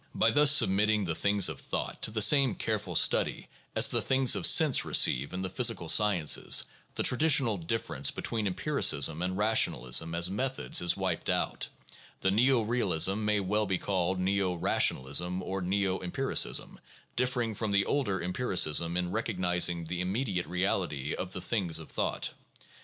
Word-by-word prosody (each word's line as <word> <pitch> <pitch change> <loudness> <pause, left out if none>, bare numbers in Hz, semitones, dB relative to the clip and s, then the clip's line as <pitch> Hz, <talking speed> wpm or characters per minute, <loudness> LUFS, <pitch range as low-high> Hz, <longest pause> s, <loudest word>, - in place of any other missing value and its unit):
By - - +3
thus 145 -1 +4
submitting 105 -5 +3
the 85 - -2
things 100 +2 +1
of 80 -4 -6
thought - - -5
to - - +2
the 110 -1 +1
same 135 -5 +4
careful 105 -5 -3
study - - +1 0.3
as - - +4
the - - 0
things 130 -1 +2
of - - +2
sense 155 -5 +5
receive 65 +3 +2
in 90 +1 -5
the - - -1
physical 115 -7 0
sciences, 100 -8 +2 0.3
the - - -1
traditional 135 -4 +3
dif 90 +7 -3
ference 70 0 -1
between 110 -3 -3
empiricism 85 - +1
and 90 +1 -3
rationalism 85 - 0
as 85 +1 0
methods 130 +8 -1
is 90 - 0
wiped - - -2
out, - - -1 0.6
and 95 +1 +1
neo 125 +2 +3
realism 105 -3 0
may 105 0 +1
as 100 - -4
well 105 +2 0
be 95 -1 -1
called 95 -1 -2
neo 95 -1 0
rationalism 85 +3 0
or 95 +1 -4
neo 95 +1 -1
em 90 - -7
piricism - - -1 0.2
— - - -30
differing 125 -2 -1
from 110 +1 -4
the 100 0 +2
older 100 -11 -1
empiricism 90 - 0
in 90 0 -2
recognizing 90 -5 -1
the 90 +2 -4
im 90 +1 -2
mediate 100 - -2
reality 90 -5 -2
of 90 - -5
the 90 - -7
"things 90 -5 -2
of 80 - -9
thought." - - -3
95 Hz, 175 wpm, -29 LUFS, 90-110 Hz, 0.6 s, sense